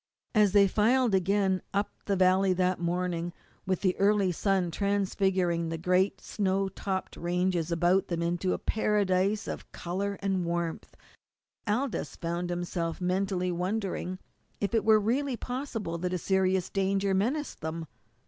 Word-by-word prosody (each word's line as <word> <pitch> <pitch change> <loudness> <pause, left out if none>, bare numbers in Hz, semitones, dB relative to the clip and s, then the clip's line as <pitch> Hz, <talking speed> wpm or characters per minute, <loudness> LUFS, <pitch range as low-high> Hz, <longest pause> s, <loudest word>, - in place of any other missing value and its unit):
As 210 -4 +4
they 200 -1 +6
filed 230 +4 +3
again 190 0 +2
up 200 +1 0
the 200 - +1
valley 185 0 +4
that 185 0 +1
morning, 175 0 -1 0.3
with 185 -2 0
the 185 -2 +2
early 200 -1 +3
sun 185 0 0
transfiguring 190 -3 0
the 165 - -3
great 180 +3 +1
snow 195 -1 0
topped 190 0 -4
ranges 175 -1 0
about 175 +3 +2
them 170 -2 -2
into 175 +2 0
a - - -1
paradise 205 -1 +1
of - - -6
colour 195 +3 -3
and 190 -2 +1
warmth, 170 -1 -3 0.7
Aldous 245 +5 -1
found 170 +1 -3
himself 175 -1 -2
mentally 185 0 0
wondering 185 0 -2 0.4
if 200 +2 -2
it 225 - +2
were 220 0 +6
really 250 +5 0
possible 235 -10 -4
that 180 +1 -2
a - - +1
serious 190 0 +1
danger 195 0 +1
menaced 255 +11 -1
them. 160 +1 -4
190 Hz, 145 wpm, -29 LUFS, 175-200 Hz, 0.7 s, they